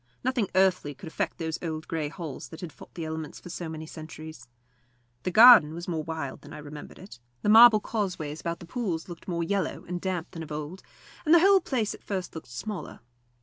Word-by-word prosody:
Nothing 250 -6 0
earthly 185 -6 +2
could 180 - -11
affect 165 +2 -3
those 160 -1 -3
old 155 -2 -4
grey 155 -3 -2
walls 160 -7 -6
that 160 - -10
had 175 -4 -7
fought - - -15
the 165 -1 -4
elements 160 -1 -5
for 175 - -10
so 170 -1 -5
many 160 0 -6
centuries. 155 -4 -10 0.7
The - - -2
garden 215 -6 +9
was 170 +1 -7
more 165 -3 -1
wild 160 -4 -5
than 150 - -12
I - - -7
remembered 150 0 -10
it; 185 - -12 0.2
the - - +2
marble 225 0 +9
causeways 180 -9 -3
about 170 0 -3
the - - -8
pools 180 -7 -3
looked 175 -2 -10
more 170 -2 -1
yellow 195 +3 -2
and 175 0 -4
damp 185 -3 -3
than 165 - -7
of 155 - -8
old, 155 +5 -5 0.4
and 320 +1 +6
the - - +8
whole 390 +2 +6
place 235 -9 -1
at - - -13
first 190 -3 -4
looked 160 - -8
smaller. 185 - -6
170 Hz, 215 wpm, -27 LUFS, 155-195 Hz, 0.7 s, garden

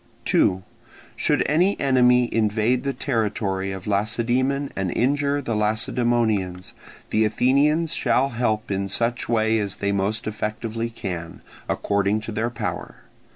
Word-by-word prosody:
2. 95 0 +2 0.5
Should - - +1
any 180 +7 +2
enemy 125 -2 +4
invade 110 +3 +1
the 140 - 0
territory 105 -7 -1
of 95 -1 -7
Lacedaemon 120 +7 0
and 95 -1 -1
injure 140 +3 +1
the 115 -3 -2
Lacedaemonians, 110 -3 0 0.4
the 110 - +3
Athenians 145 +9 +2
shall 130 0 +2
help 115 -3 -1
in 100 0 -1
such 120 +4 -1
way 110 -1 +2
as 100 -2 -2
they 100 0 -1
most 100 +3 -1
effectively 110 +2 -3
can, 90 -7 -6 0.3
according 100 +1 +1
to 110 - -6
their 110 +2 -1
power. 105 -7 -5
115 Hz, 130 wpm, -23 LUFS, 100-125 Hz, 0.5 s, enemy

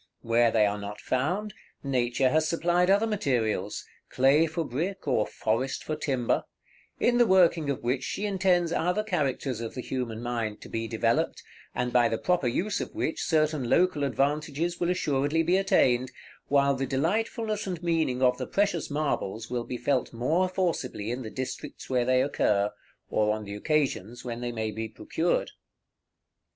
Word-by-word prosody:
Where 115 +1 +3
they 110 -2 +3
are 105 0 -1
not 105 0 -7
found, 180 +11 -1 0.3
Nature 130 -1 +1
has 155 +3 +2
supplied 175 +2 +2
other 200 +3 +4
materials, 120 - -1 0.2
clay 140 +5 +4
for 160 +1 -2
brick, 165 +8 -3
or 110 -6 +2
forest 120 +4 -1
for 155 - -3
timber, 135 -6 0 0.6
in 240 0 +3
the 240 - +5
working 170 -5 +4
of 140 - -2
which 125 +2 0
she 205 - -3
intends 185 -4 +2
other 180 +6 +1
characters 140 - -1
of 115 - -5
the 125 - -3
human 120 -3 -4
mind 115 -3 -2
to - - -10
be 115 0 -3
developed, 115 +1 0 0.3
and 125 0 -1
by 120 -2 +4
the 115 - -1
proper 180 -4 +1
use 195 - -1
of - - -6
which 160 - -2
certain 155 -6 +1
local 180 -2 +3
advantages 150 +5 0
will 175 - +1
assuredly 150 -3 +1
be 175 +3 +2
attained, 130 -10 +3 0.4
while 140 0 +3
the 135 0 -2
delightfulness 210 - -1
and 175 -3 -4
meaning 160 -7 +1
of 125 0 +3
the - - -3
precious 195 -5 0
marbles 120 -7 -2
will 120 -1 -2
be 125 - -4
felt 125 +2 0
more 155 +11 +1
forcibly 165 - -2
in 125 +2 -3
the 110 - -6
districts 130 +2 -6
where 125 -2 +2
they 130 +1 +3
occur, 105 -7 +1 0.4
or 105 0 +2
on 110 - -6
the 100 0 -7
occasions 120 -2 -1
when 120 -1 -4
they 120 0 -2
may 110 -2 -2
be 110 +1 -4
procured. - - -1
135 Hz, 170 wpm, -27 LUFS, 120-170 Hz, 0.6 s, the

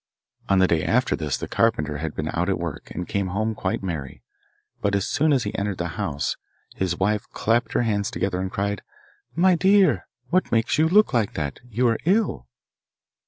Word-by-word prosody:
On 95 - +4
the 95 - +5
day 85 -3 +1
after 125 +2 +2
this 75 -4 -2
the - - -5
carpenter 80 -11 +1
had 80 +1 -4
been 75 0 -3
out 90 +3 -1
at 95 - +1
work, 85 -4 -6
and 90 - -5
came 100 -2 -1
home 110 +4 -1
quite 95 -2 -2
merry; 80 -8 -5 0.6
but 100 -1 +1
as 100 - 0
soon 155 +2 +2
as 135 -4 +3
he 105 - -4
entered 100 -2 -2
the 85 -1 -2
house 75 -2 -2 0.4
his 90 -2 -1
wife 105 +2 0
clapped 115 +2 +1
her - - +2
hands 105 -2 0
together 95 -1 -2
and 95 - -2
cried, 100 0 -2 0.5
'My 185 +2 +5
dear, 190 - +4 0.2
what 185 +1 +2
makes 115 +5 +2
you 160 +1 +4
look 210 -3 +4
like 115 -4 +1
that? 75 -3 -3
You 120 +3 +1
are 115 -1 +1
ill. 195 - +1
100 Hz, 200 wpm, -24 LUFS, 85-120 Hz, 0.6 s, the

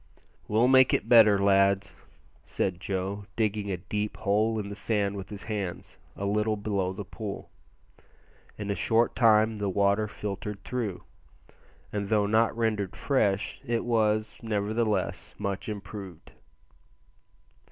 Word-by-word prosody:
"We'll 110 +4 +3
make 130 0 +6
it - - -2
better, 110 -4 +7
lads," 100 0 +3 0.5
said 90 -2 -2
Joe, 95 +2 -3
digging 105 -2 -1
a 95 - -1
deep 105 +4 -4
hole 110 +1 +1
in 105 -2 -3
the - - -5
sand 100 -1 -1
with 95 -2 -7
his 100 -1 -7
hands, 100 -5 -5 0.2
a 100 - -4
little 105 +2 +1
below 100 -3 -1
the 95 +1 -6
pool. 105 0 -7 1.1
In 105 -1 -3
a - - -1
short 115 +3 +2
time 110 -2 +4
the 100 -1 -1
water 100 +2 +2
filtered 105 -1 -6
through, 115 -7 -3 0.9
and 100 -1 -2
though 105 -1 +2
not 110 +2 +2
rendered 105 -5 -1
fresh, 105 -8 0
it 120 -3 -1
was, 110 -2 +1
nevertheless, 105 -2 -1
much 100 +2 -3
improved. 100 -4 -8
105 Hz, 135 wpm, -28 LUFS, 100-110 Hz, 1.1 s, better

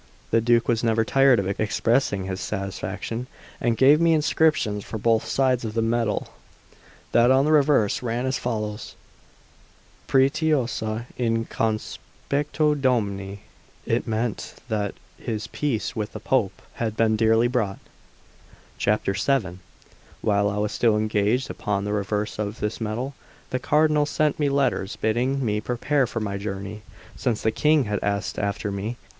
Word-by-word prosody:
The 115 - +4
Duke 120 +1 +3
was 115 -1 +1
never 115 -1 +2
tired 135 +1 +5
of 100 - -1
expressing 110 -2 +1
his 95 0 -4
satisfaction, 105 +4 -4 0.3
and 115 -1 0
gave 145 +4 +6
me 165 -1 +4
inscriptions 150 -9 +2
for 110 - -6
both 115 +1 +2
sides 130 -2 +1
of 110 -1 -4
the 115 - +1
medal. 115 -2 0 0.8
That 120 +1 +5
on 135 +1 +4
the 155 - +2
reverse 145 -8 +3
ran 120 +1 -2
as 130 0 -1
follows: 105 -3 -4 1.1
'Pretiosa 135 -6 +1
in 115 -2 +1
conspectu 145 +7 -2
Domini;' 100 -6 0 0.4
it - - 0
meant 115 0 -2
that 105 -2 -1 0.2
his 110 -2 -4
peace 135 -7 -2
with 105 -1 -3
the - - -6
Pope 110 -8 0 0.2
had 110 -2 -2
been 110 -1 +3
dearly 115 +1 +3
bought. 115 -6 -1 1.1
VII 105 -1 0 0.6
WHILE 100 -1 +2
I 105 - -3
was 105 0 0
still 115 -3 +2
engaged 110 +3 +1
upon 100 -1 -2
the 105 - -2
reverse 105 +1 -2
of 105 0 -3
this 105 +2 -3
medal, 115 +6 -3 0.4
the 130 - 0
Cardinal 150 +1 +3
sent 150 0 0
me 145 -2 +2
letters 135 -7 0
bidding 125 +4 0
me 105 -1 0
prepare 125 +4 0
for 115 - -4
my 100 -2 -3
journey, 100 +1 -5 0.3
since 115 -4 -1
the 110 - +2
King 150 +5 +3
had 105 -3 -2
asked 100 0 -1
after 100 0 -2
me. 105 +5 -4
115 Hz, 150 wpm, -24 LUFS, 105-130 Hz, 1.1 s, gave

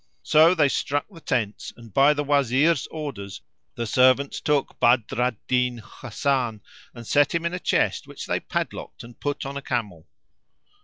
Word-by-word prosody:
So 160 +4 +5
they 150 -4 +4
struck 145 +1 -1
the 165 -4 -14
tents 110 -7 -2
and 115 -4 -14
by 140 +2 +5
the 145 - -1
Wazir's 140 +2 +2
orders 130 - -7 0.3
the 120 - -3
servants 130 +4 +3
took 150 -2 0
Badr 120 -1 +2
al 125 -1 +1
Din 125 -1 +1
Hasan, 120 0 -3 0.3
and 120 -1 -10
set 145 +6 +2
him 170 0 -1
in 170 - -1
a 180 - -3
chest - - 0
which - - -8
they - - -1
padlocked - - -5
and 120 0 -14
put 145 -1 -3
on 140 +1 -5
a - - -5
camel. 105 -11 -4
130 Hz, 170 wpm, -24 LUFS, 120-145 Hz, 0.3 s, So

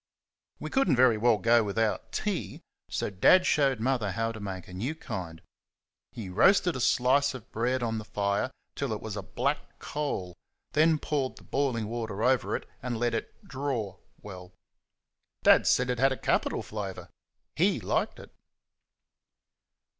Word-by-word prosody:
We - - -6
could 270 -7 +2
n't 135 - +3
very 125 -4 +5
well 115 0 +4
go 115 +1 +4
without 105 +1 -1
tea, - - -3 0.3
so - - -2
Dad 180 - +5
showed 135 -5 +2
Mother 115 -5 0
how 115 +3 -1
to 110 - -8
make 95 -3 -6
a 90 - -11
new 120 +12 -3
kind. 90 - -7 0.7
He 110 -4 -7
roasted 175 - +4
a - - -3
slice 130 +3 +3
of 120 -3 -11
bread 120 +3 0
on 115 -1 -1
the - - -7
fire 100 +2 -1 0.2
till 140 -5 -2
it 105 - -4
was 110 -2 -6
like 105 - -5
a - - -20
black 140 +4 0 0.2
coal, 140 -12 -4 0.4
then 155 +1 +4
poured 140 -3 -2
the - - -15
boiling 130 -6 -1
water 110 -2 -4
over 130 +1 +2
it - - -5
and 120 -1 -3
let 120 +1 0
it 115 - -5
"draw" 125 -8 -3 0.3
well. 90 -3 -9 0.9
Dad - - +6
said 125 0 +3
it 125 - -3
had 135 +1 +4
a 130 - -2
capital - - 0
flavour 100 -3 -6 0.5
HE - - +2
liked - - -1
it. - - -13
115 Hz, 170 wpm, -28 LUFS, 105-135 Hz, 0.9 s, Dad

